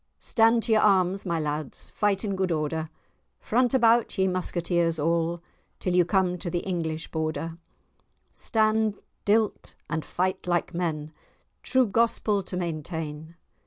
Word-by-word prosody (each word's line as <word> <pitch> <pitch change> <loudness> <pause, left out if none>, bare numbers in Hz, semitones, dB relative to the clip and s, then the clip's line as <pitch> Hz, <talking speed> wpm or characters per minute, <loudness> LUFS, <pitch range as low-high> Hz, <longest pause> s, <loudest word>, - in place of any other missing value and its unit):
Stand 230 -1 +3
to 230 - -1
your 215 -1 +5
arms, 195 -1 +3
my 170 -1 0
lads, 150 -2 -4
Fight 205 0 0
in 200 -2 -1
good 190 -1 0
order; 155 0 -1 0.5
Front 245 +2 +1
about, 235 -2 +3
ye 190 - +3
musketeers 175 -2 0
all, 165 +2 0 0.4
Till 180 - -1
ye 180 0 +5
come 180 0 +1
to 175 - -4
the 175 +1 -1
English 165 -4 -3
Border; 160 +1 -3 0.7
Stand 220 -1 +1 0.3
till 215 +1 +4
't, - - -15 0.2
and 160 -1 -1
fight 185 0 -2
like 175 0 0
men, 155 -3 -2 0.5
True 260 -1 +3
gospel 220 -2 +1
to 185 -1 -5
maintain. 160 -2 -5
180 Hz, 145 wpm, -26 LUFS, 165-210 Hz, 0.7 s, your